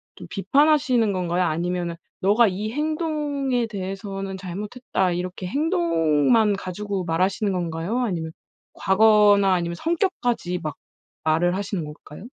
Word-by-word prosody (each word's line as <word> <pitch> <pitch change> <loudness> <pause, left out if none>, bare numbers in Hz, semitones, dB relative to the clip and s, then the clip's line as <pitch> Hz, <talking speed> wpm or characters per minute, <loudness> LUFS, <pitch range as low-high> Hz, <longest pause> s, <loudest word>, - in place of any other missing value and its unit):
좀 - - -11
비판하시는 255 - +3
건가요? 180 -1 0
아니면은 175 +1 -1 0.3
"너가 210 +5 +4
이 205 +3 -3
행동에 295 -4 -1
대해서는 195 -1 -5
잘못했다." 190 +1 -2
이렇게 180 +1 -4
행동만 175 - +2
가지고 195 +1 -4
말하시는 190 +5 0
건가요? 175 +4 -2
아니면 175 -10 -2 0.4
과거나 205 -1 +4
아니면 170 -1 -2
성격까지 245 - -1
막 155 -1 -4 0.5
말을 165 +3 +2
하시는 195 -3 -3
걸까요? 150 +4 -11
195 Hz, 315 characters per minute, -23 LUFS, 175-230 Hz, 0.5 s, 너가